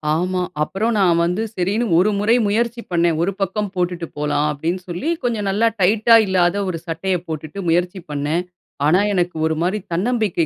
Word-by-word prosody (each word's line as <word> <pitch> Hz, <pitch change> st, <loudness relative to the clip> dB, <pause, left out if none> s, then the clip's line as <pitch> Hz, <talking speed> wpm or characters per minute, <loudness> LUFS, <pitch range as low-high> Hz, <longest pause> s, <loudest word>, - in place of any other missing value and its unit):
ஆமா. 180 Hz, +2 st, -1 dB, 0.2 s
அப்புறம் 215 Hz, +9 st, -1 dB
நான் 175 Hz, -3 st, +3 dB
வந்து 180 Hz, +6 st, -1 dB
சரின்னு 205 Hz, +6 st, 0 dB
ஒரு 190 Hz, +4 st, +4 dB
முறை 220 Hz, +4 st, +3 dB
முயற்சி 235 Hz, +3 st, 0 dB
பண்ணேன். 170 Hz, -2 st, +2 dB
ஒரு 185 Hz, -, +1 dB
பக்கம் 195 Hz, +1 st, -1 dB
போட்டுட்டு 175 Hz, -2 st, -2 dB
போலாம் 150 Hz, 0 st, 0 dB
அப்படின்னு 165 Hz, +5 st, -3 dB
சொல்லி, 175 Hz, -, -3 dB
கொஞ்சம் 220 Hz, -5 st, -1 dB
நல்லா 215 Hz, +4 st, +2 dB
டைட்டா 215 Hz, +5 st, +5 dB
இல்லாத 185 Hz, 0 st, +2 dB
ஒரு 170 Hz, -, -3 dB
சட்டையை 180 Hz, +3 st, -1 dB
போட்டுட்டு 155 Hz, +3 st, -6 dB
முயற்சி 175 Hz, +3 st, +1 dB
பண்ணேன். 150 Hz, +4 st, -1 dB, 0.4 s
ஆனா 175 Hz, +5 st, +4 dB
எனக்கு 180 Hz, -2 st, 0 dB
ஒரு 160 Hz, 0 st, 0 dB
மாரி 185 Hz, +4 st, 0 dB
தன்னம்பிக்கை 200 Hz, -2 st, 0 dB
180 Hz, 165 wpm, -20 LUFS, 170-205 Hz, 0.4 s, டைட்டா